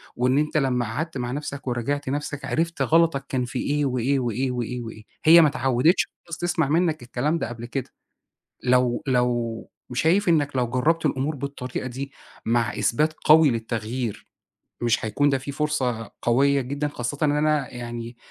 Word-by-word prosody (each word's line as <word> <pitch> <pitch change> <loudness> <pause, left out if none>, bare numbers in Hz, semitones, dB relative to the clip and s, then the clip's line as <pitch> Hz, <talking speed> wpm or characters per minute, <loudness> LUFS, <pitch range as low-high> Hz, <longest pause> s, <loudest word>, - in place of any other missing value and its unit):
وإن 130 +2 +2
أنت 150 +1 +1
لمّا 125 -4 +1
قعدت 150 +8 -4
مع 125 -1 -3
نَفْسك 140 0 -5
وراجعت 130 +3 -2
نَفْسك 145 +1 -3
عِرفت 165 +1 -1
غلطك 165 -4 +3
كان 125 -2 0
في 120 - -4
إيه، 145 0 0
وإيه، 130 +2 +1
وإيه، 125 +1 -1
وإيه، 125 0 -3
وإيه. 110 -2 -9 0.2
هي 165 +2 +9
ما 155 - +6
اتعودتش 135 +4 +2 0.2
خالص 165 -1 -5
تسمَع 175 -4 0
منك 160 0 +1
الكلام 135 +7 -1
ده 120 - -3
قبل 120 0 -7
كده. 130 +1 -4 0.7
لو 125 -1 +2
لو 120 -3 0 0.2
شايف 175 +9 +2
إنك 145 -4 +2
لو 125 -2 +1
جربت 155 +7 +1
الأمور 145 +1 0
بالطريقة 130 -2 -5
دي 135 +2 -6 0.3
مع 115 +1 +1
إثبات 155 +6 +1
قوي 155 -1 +7
للتغيير، 115 0 -3 0.5
مش 120 -1 +1
هيكُون 145 +7 +2
ده 135 - +2
فيه 135 +2 -6
فرصة 130 -7 -1
قوية 140 +3 +3
جدًا؟ 140 +3 -2
خاصةً 125 -1 -4
إن 145 - +3
أنا 150 -3 +1
يعني 120 0 -6
135 Hz, 165 wpm, -24 LUFS, 120-150 Hz, 0.7 s, هي